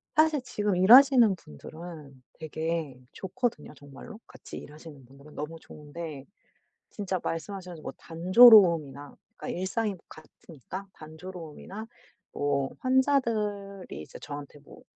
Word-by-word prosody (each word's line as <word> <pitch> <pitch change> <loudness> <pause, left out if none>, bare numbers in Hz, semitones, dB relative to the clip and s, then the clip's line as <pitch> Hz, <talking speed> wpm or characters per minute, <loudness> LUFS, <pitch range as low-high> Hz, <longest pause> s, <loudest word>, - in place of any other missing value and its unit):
사실 310 -2 +3
지금 210 -5 -2
일하시는 240 +2 +7
분들은 155 - -12
되게 160 -3 -4
좋거든요 235 0 -4
정말로? 145 - -12
같이 - - -11
일하시는 150 -2 -12
분들은 140 +4 -17
너무 155 +2 -6
좋은데 150 -2 -9 0.7
진짜 195 -3 -3
말씀하셔 180 +3 -5
가지고 160 -3 -12
뭐 - - -4
단조로움이나 170 - +5 0.2
그러니까 - - -5
일상이 205 +3 -2
같으니까 165 - -11
단조로움이나 170 +5 -10 0.5
뭐 140 -1 -1
환자들이 220 - 0
이제 - - -12
저한테 145 0 -9
뭐 145 - -16
170 Hz, 315 characters per minute, -28 LUFS, 150-205 Hz, 0.7 s, 일하시는